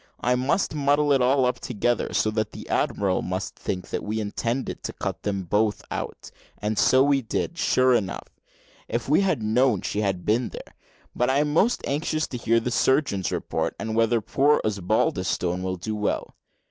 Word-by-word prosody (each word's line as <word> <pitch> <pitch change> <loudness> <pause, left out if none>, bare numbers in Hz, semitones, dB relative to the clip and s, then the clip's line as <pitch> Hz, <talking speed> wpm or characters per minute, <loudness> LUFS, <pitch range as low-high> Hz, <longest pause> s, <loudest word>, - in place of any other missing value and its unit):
I 125 - +2
must 130 +10 0
muddle 145 0 +2
it 135 - +3
all 130 +1 +3
up 125 - 0
together, 120 0 -1
so 110 - +1
that 110 -1 -2
the - - -9
admiral 95 -2 +1
must 95 +1 -4
think 90 -1 -4 0.2
we 110 +1 -3
intended 115 +4 -3
to - - -5
cut - - -4
them 100 -2 -2
both 105 +4 0
out - - -5 0.3
and 105 0 -2
so 130 +1 +5
we 140 -1 +3
did, 130 +7 -3
sure 130 0 +3
enough, 100 -6 -1 0.6
if 115 +1 -3
we 150 +7 +4
had 185 - 0
known 110 -1 +2
she 105 - -1
had 95 -4 -1
been 115 +3 +1
there. - - -10 0.4
But 125 - +1
I 135 - +2
am 150 0 +1
most 215 +9 +2
anxious 155 +2 -1
to 125 - -4
hear 115 0 +2
the 120 +2 -3
surgeon's 130 - +1
report, - - -2
and 110 0 -3
whether 115 0 +2
poor 145 +7 +3
Osbaldistone 90 -3 0
will 95 0 -2
do 110 +5 -4
well. 105 -1 -2
115 Hz, 185 wpm, -25 LUFS, 105-135 Hz, 0.6 s, so